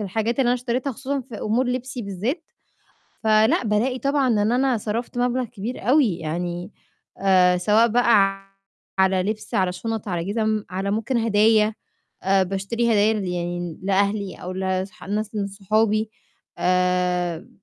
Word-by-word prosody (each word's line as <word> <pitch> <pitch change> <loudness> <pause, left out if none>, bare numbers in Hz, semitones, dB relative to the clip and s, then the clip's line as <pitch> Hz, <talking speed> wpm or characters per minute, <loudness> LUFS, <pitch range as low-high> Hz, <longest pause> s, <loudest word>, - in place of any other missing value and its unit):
الحاجات 220 +4 -2
اللي 265 - +3
أنا 245 - +4
اشتريتها 250 +2 -2
خصوصًا 270 +3 -3
في 245 -2 -12
أمور 230 +5 +1
لِبسي 255 0 -3
بالذات، 215 - -3 0.8
فلأ 220 +1 +4
بالاقي 230 +5 +1
طبعًا 275 -1 +1
إن 215 -1 +2
أنا 255 0 +2
صرفت 230 +4 -4
مبلغ 250 +1 +1
كبير 230 0 -6
أوي 250 - +4
يعني 175 +4 -4 0.5
آآ، 185 -2 +4
سواء 210 +5 +4
بقى 205 -4 +3 0.5
على 190 -1 +3
لِبس، 215 +3 -4
على 185 -1 +2
شُنَط، 220 +3 -4
على 175 -2 -2
جِزم، 215 +1 -1
على 195 +2 -2
ممكن 225 +5 -1
هدايا. 215 -1 +3 0.5
آآ 195 0 +4
باشتري 195 +5 -2
هدايا 215 +1 +3
ل 210 -3 -2
يعني 175 -1 -4
لأهلي 200 0 0
أو 180 +1 -6
لاص 190 0 -2 0.2
لناس 210 +1 -2
من 200 -1 -1
صحابي 215 +2 0 0.5
آآ، 180 -1 0
210 Hz, 145 wpm, -23 LUFS, 190-235 Hz, 0.8 s, أنا